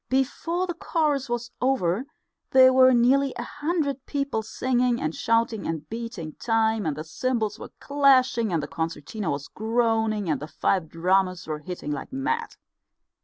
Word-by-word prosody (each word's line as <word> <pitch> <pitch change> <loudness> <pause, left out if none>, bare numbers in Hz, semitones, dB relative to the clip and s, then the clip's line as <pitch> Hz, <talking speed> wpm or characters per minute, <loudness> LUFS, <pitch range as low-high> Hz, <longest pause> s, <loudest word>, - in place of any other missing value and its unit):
Before 330 +7 0
the 350 - -3
chorus 300 -5 0
was 240 0 -3
over 250 -4 +1 0.4
there 260 0 +7
were 260 0 +7
nearly 260 +3 +3
a 240 - -3
hundred 290 -2 -2
people 280 -6 -1
singing 245 +2 0
and 155 +1 -2
shouting 230 0 0
and 160 -2 -4
beating 225 -9 -5
time, 225 -3 +1
and 150 -2 -2
the 155 - -4
cymbals 220 +6 -2
were - - -8
clashing, 260 -5 +3
and 165 -4 0
the - - -4
concertina 165 +4 -4
was 140 0 -3
groaning, 220 -2 0
and 150 -4 0
the 150 - -6
five 175 0 0
drummers 185 +1 +1
were 155 -1 -4
hitting 150 -1 -6
like 145 - -5
mad. 295 - -2
230 Hz, 160 wpm, -25 LUFS, 180-260 Hz, 0.4 s, there